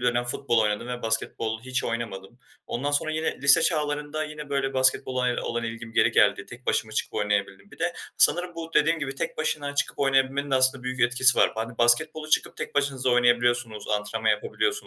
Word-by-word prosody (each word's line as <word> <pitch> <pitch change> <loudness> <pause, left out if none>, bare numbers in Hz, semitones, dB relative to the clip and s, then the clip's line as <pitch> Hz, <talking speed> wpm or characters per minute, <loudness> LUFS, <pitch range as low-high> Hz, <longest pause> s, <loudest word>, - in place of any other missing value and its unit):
dönem 120 0 +1
futbol 120 -1 0
oynadım 105 +2 0
ve 125 0 -5
basketbol 110 0 -2
hiç 130 +1 -2
oynamadım. 115 -2 -5 0.3
Ondan 140 +4 -2
sonra 145 +2 0
yine 160 -3 -2
lise 140 +4 +6
çağlarında 150 -1 -1
yine, 150 -1 -8
böyle, 135 -1 -1
basketbola, 130 -1 +2
eee, 125 - -1
olan 120 0 -3
ilgim 115 0 -7
geri 110 +1 +3
geldi. - - +3
Tek - - -13
başıma - - 0
çıkıp - - -3
oynayabildim. 100 -2 -2
Bir - - -15
de - - -1 0.2
sanırım 175 0 +3
bu 165 -1 -7
dediğim 160 +2 +3
gibi 140 -3 -4
tek - - -4
başına 145 -2 -2
çıkıp 145 - -1
oynayabilmenin 135 0 +1
de - - +2
aslında 130 0 +2
büyük 125 0 -4
etkisi 125 +1 +4
var. - - +4
Hani, 115 +1 -5
basketbolu 155 +6 +2 0.3
tek - - -6
başınıza 135 -2 0
oynayabiliyorsunuz, 120 -2 +1
antrenman 105 0 0
yapabiliyorsunuz. 455 -2 0
130 Hz, 185 wpm, -25 LUFS, 120-145 Hz, 0.3 s, lise